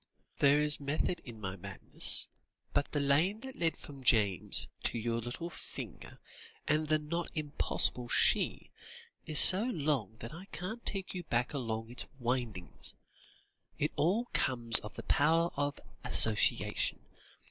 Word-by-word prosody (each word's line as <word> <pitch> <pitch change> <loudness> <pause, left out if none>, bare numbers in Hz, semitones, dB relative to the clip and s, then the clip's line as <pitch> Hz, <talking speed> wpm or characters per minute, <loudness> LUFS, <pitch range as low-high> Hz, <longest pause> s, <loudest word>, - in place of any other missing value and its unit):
"There 140 +1 +5
is 150 0 +1
method 150 +5 -2
in 115 -3 -10
my 95 -2 -4
madness, 100 0 -1 0.5
but 145 - 0
the 145 - -1
lane 155 +10 +1
that 265 0 -9
led 165 -1 -1
from 140 -2 -11
James 105 - +2
to - - -1
your 115 +1 -2
little 120 +9 -6
finger, - - -9 0.5
and 155 +1 +1
the 155 0 +3
not 160 +3 -4
impossible 145 -4 -1
she, - - +1 0.6
is 155 -1 +2
so 190 +7 +11
long 145 - -2
that 115 +3 -9
I 180 +4 -10
can't 200 +5 -7
take 195 -2 -2
you 180 - -4
back 120 +2 -1
along 115 -4 -4
its 125 - -3
windings. 120 -7 -4 0.8
It - - -1
all 200 +10 +1
comes 120 -3 +2
of 105 - -10
the - - -8
power 165 +4 +2
of 145 0 -2 0.2
association. 110 -1 +1
145 Hz, 145 wpm, -32 LUFS, 115-165 Hz, 0.8 s, so